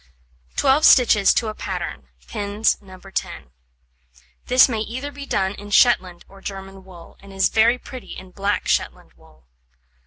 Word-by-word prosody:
Twelve 275 Hz, +3 st, +2 dB
stitches 220 Hz, -9 st, +6 dB
to 230 Hz, -, 0 dB
a 215 Hz, -, -4 dB
pattern, 65 Hz, -, -6 dB, 0.2 s
pins 205 Hz, +2 st, 0 dB
No. 190 Hz, -2 st, -14 dB
10. 190 Hz, -, -6 dB, 1.0 s
This 255 Hz, +1 st, +6 dB
may 230 Hz, -4 st, -3 dB
either 255 Hz, +6 st, -5 dB
be 285 Hz, 0 st, -10 dB
done 190 Hz, 0 st, 0 dB
in 205 Hz, 0 st, -11 dB
Shetland 190 Hz, -6 st, +2 dB
or 195 Hz, 0 st, -17 dB
German 195 Hz, -1 st, -8 dB
wool, 180 Hz, -3 st, -15 dB
and 200 Hz, 0 st, -15 dB
is 195 Hz, 0 st, +1 dB
very 230 Hz, +3 st, +3 dB
pretty 255 Hz, 0 st, -10 dB
in 185 Hz, -1 st, -12 dB
black 200 Hz, +1 st, -2 dB
Shetland -, -, -2 dB
wool. -, -, -23 dB
205 Hz, 155 wpm, -21 LUFS, 190-240 Hz, 1.0 s, stitches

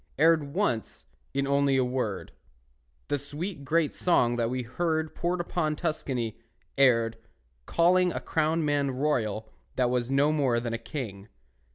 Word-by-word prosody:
Erred 160 Hz, 0 st, +4 dB
once, 155 Hz, -, -1 dB, 0.3 s
in 140 Hz, 0 st, 0 dB
only 140 Hz, -1 st, +2 dB
a 130 Hz, -, +3 dB
word, 125 Hz, -5 st, -3 dB, 0.8 s
The 145 Hz, -, 0 dB
sweet 145 Hz, +3 st, -6 dB
great 155 Hz, +2 st, +1 dB
song 120 Hz, -9 st, +2 dB
that 115 Hz, -1 st, +1 dB
we 125 Hz, 0 st, -2 dB
heard 160 Hz, +5 st, -1 dB
Poured 175 Hz, +1 st, -1 dB
upon 170 Hz, -3 st, -1 dB
Tuscany, 130 Hz, -9 st, -2 dB, 0.4 s
erred, 115 Hz, -4 st, +3 dB, 0.5 s
Calling 180 Hz, +1 st, +4 dB
a -, -, -3 dB
crowned 160 Hz, 0 st, 0 dB
man 145 Hz, -1 st, +1 dB
royal 125 Hz, -6 st, -1 dB, 0.3 s
That 125 Hz, -1 st, +2 dB
was 125 Hz, -1 st, 0 dB
no 140 Hz, +2 st, +3 dB
more 135 Hz, -6 st, +2 dB
than 120 Hz, -1 st, -3 dB
a 115 Hz, -, -2 dB
king. 115 Hz, -5 st, -6 dB
140 Hz, 150 wpm, -28 LUFS, 120-160 Hz, 0.8 s, Erred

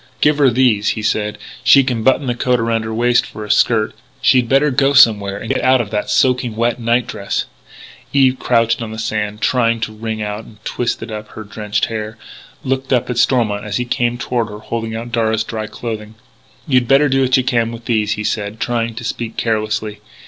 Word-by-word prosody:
"Give 150 Hz, 0 st, +3 dB
her 140 Hz, -2 st, +5 dB
these," 120 Hz, -4 st, +2 dB
he 110 Hz, -, -4 dB
said. 105 Hz, -1 st, -1 dB, 0.3 s
"She 140 Hz, -, +7 dB
can 125 Hz, -3 st, -2 dB
button 130 Hz, +4 st, +2 dB
the 125 Hz, -, 0 dB
coat 125 Hz, +1 st, +1 dB
around 115 Hz, 0 st, 0 dB
her 110 Hz, -, -4 dB
waist 120 Hz, +2 st, +2 dB
for 105 Hz, -, -8 dB
a 105 Hz, -, -2 dB
skirt. 110 Hz, -2 st, +2 dB, 0.3 s
She'd 125 Hz, -3 st, +3 dB
better 140 Hz, +2 st, +3 dB
go 135 Hz, +2 st, +2 dB
somewhere 105 Hz, -7 st, +5 dB
and 115 Hz, -, -3 dB
get -, -, -2 dB
out 130 Hz, 0 st, +4 dB
of 110 Hz, -4 st, -3 dB
that 105 Hz, -1 st, -2 dB
soaking 125 Hz, -3 st, +1 dB
wet 120 Hz, +2 st, 0 dB
night 120 Hz, +1 st, +1 dB
dress 100 Hz, -, -3 dB, 0.4 s
" -, -, -19 dB
Eve, 130 Hz, -2 st, +3 dB
crouched 115 Hz, -1 st, +1 dB
on 115 Hz, -1 st, -5 dB
the 110 Hz, -, -7 dB
sand, 105 Hz, -1 st, -3 dB
trying 115 Hz, -2 st, +2 dB
to 110 Hz, -, -3 dB
wring 110 Hz, 0 st, -5 dB
out 105 Hz, +1 st, -4 dB
and 110 Hz, -, -16 dB
twist 120 Hz, -2 st, -2 dB
up 105 Hz, -2 st, -7 dB
her 110 Hz, -, -9 dB
drenched 105 Hz, 0 st, -2 dB
hair, 110 Hz, 0 st, -5 dB, 0.5 s
looked 130 Hz, 0 st, -2 dB
up 125 Hz, -1 st, +1 dB
at 120 Hz, -, -1 dB
Stormont 110 Hz, -6 st, +1 dB
as 105 Hz, -2 st, -3 dB
he 125 Hz, -, -2 dB
came 120 Hz, 0 st, 0 dB
toward 120 Hz, -2 st, -2 dB
her 105 Hz, -, -8 dB
holding 115 Hz, +1 st, -4 dB
out 115 Hz, +1 st, -6 dB
Darragh's 110 Hz, -1 st, +1 dB
dry 110 Hz, -1 st, -5 dB
clothing. 110 Hz, -2 st, -6 dB, 0.5 s
"You'd 125 Hz, -4 st, +2 dB
better 140 Hz, +3 st, +5 dB
do 135 Hz, -1 st, +2 dB
what 130 Hz, -1 st, +3 dB
you 130 Hz, -, +1 dB
can 115 Hz, -2 st, 0 dB
with 115 Hz, 0 st, -9 dB
these," 105 Hz, -3 st, +1 dB
he 105 Hz, -, -4 dB
said, 105 Hz, 0 st, -3 dB
trying 115 Hz, -1 st, -1 dB
to 120 Hz, -, -7 dB
speak 115 Hz, 0 st, -4 dB
carelessly.... 110 Hz, -1 st, -2 dB
115 Hz, 215 wpm, -17 LUFS, 110-125 Hz, 0.5 s, She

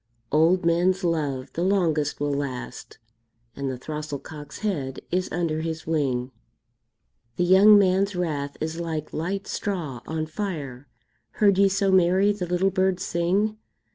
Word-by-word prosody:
Old 165 Hz, +4 st, +3 dB
men's 180 Hz, +3 st, +2 dB
love 145 Hz, -6 st, -1 dB
the 170 Hz, -, -3 dB
longest 165 Hz, -6 st, +1 dB
will 145 Hz, 0 st, 0 dB
last, 135 Hz, -3 st, -5 dB, 0.6 s
And 140 Hz, -1 st, -3 dB
the 130 Hz, -, -4 dB
throstle 150 Hz, +2 st, -5 dB
cock's 150 Hz, 0 st, -10 dB
head 140 Hz, -10 st, -2 dB
is 180 Hz, +1 st, -1 dB
under 160 Hz, -2 st, -1 dB
his 160 Hz, -1 st, -4 dB
wing. 135 Hz, -5 st, -1 dB, 1.0 s
The 180 Hz, -, +1 dB
young 195 Hz, +4 st, +7 dB
man's 195 Hz, 0 st, +2 dB
wrath 145 Hz, -5 st, -2 dB
is 160 Hz, +1 st, -3 dB
like 160 Hz, -3 st, -4 dB
light 190 Hz, +5 st, -3 dB
straw 160 Hz, -, -4 dB
on 160 Hz, 0 st, -2 dB
fire; 155 Hz, -7 st, -5 dB, 0.5 s
Heard 200 Hz, -2 st, +3 dB
ye 200 Hz, 0 st, +5 dB
so 195 Hz, 0 st, +1 dB
merry 190 Hz, +2 st, +4 dB
the 190 Hz, -3 st, -4 dB
little 180 Hz, +2 st, +1 dB
bird 185 Hz, -1 st, +1 dB
sing? 195 Hz, +6 st, 0 dB
170 Hz, 145 wpm, -25 LUFS, 150-190 Hz, 1.0 s, young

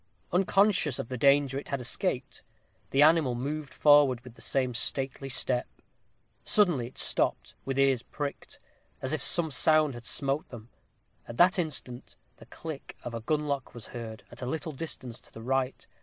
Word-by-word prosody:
Unconscious 190 Hz, -, +3 dB
of -, -, -5 dB
the 130 Hz, -, -3 dB
danger 140 Hz, +1 st, +4 dB
it -, -, -11 dB
had 140 Hz, -, -2 dB
escaped, 125 Hz, -, -2 dB, 0.5 s
the 140 Hz, +2 st, +4 dB
animal 155 Hz, -5 st, +4 dB
moved 145 Hz, +3 st, -4 dB
forward 145 Hz, -2 st, +5 dB
with 125 Hz, -2 st, -12 dB
the -, -, -16 dB
same 130 Hz, -2 st, 0 dB
stately 135 Hz, +3 st, 0 dB
step. 125 Hz, -1 st, 0 dB, 0.8 s
Suddenly 175 Hz, -, +3 dB
it 125 Hz, -, -15 dB
stopped, -, -, 0 dB
with 135 Hz, 0 st, -2 dB
ears 135 Hz, -3 st, +3 dB
pricked, 145 Hz, +3 st, -6 dB, 0.4 s
as 130 Hz, +3 st, -2 dB
if 155 Hz, -, -1 dB
some 165 Hz, -3 st, 0 dB
sound 155 Hz, +2 st, +3 dB
had 120 Hz, -1 st, -9 dB
smote 140 Hz, +2 st, -1 dB
them. 120 Hz, -2 st, -11 dB, 0.6 s
At 120 Hz, -, -8 dB
that 185 Hz, +3 st, +5 dB
instant 130 Hz, -6 st, -3 dB, 0.2 s
the -, -, -15 dB
click 155 Hz, -4 st, -8 dB
of 120 Hz, -, -6 dB
a 115 Hz, -, -4 dB
gun 150 Hz, +5 st, -1 dB
lock 140 Hz, -4 st, -3 dB
was 120 Hz, -, -8 dB
heard, 115 Hz, -1 st, -7 dB
at -, -, -10 dB
a 125 Hz, -, -3 dB
little 160 Hz, +3 st, -3 dB
distance 130 Hz, -5 st, -6 dB
to -, -, -15 dB
the 115 Hz, -, -10 dB
right. 130 Hz, +1 st, -1 dB
135 Hz, 175 wpm, -29 LUFS, 125-150 Hz, 0.8 s, forward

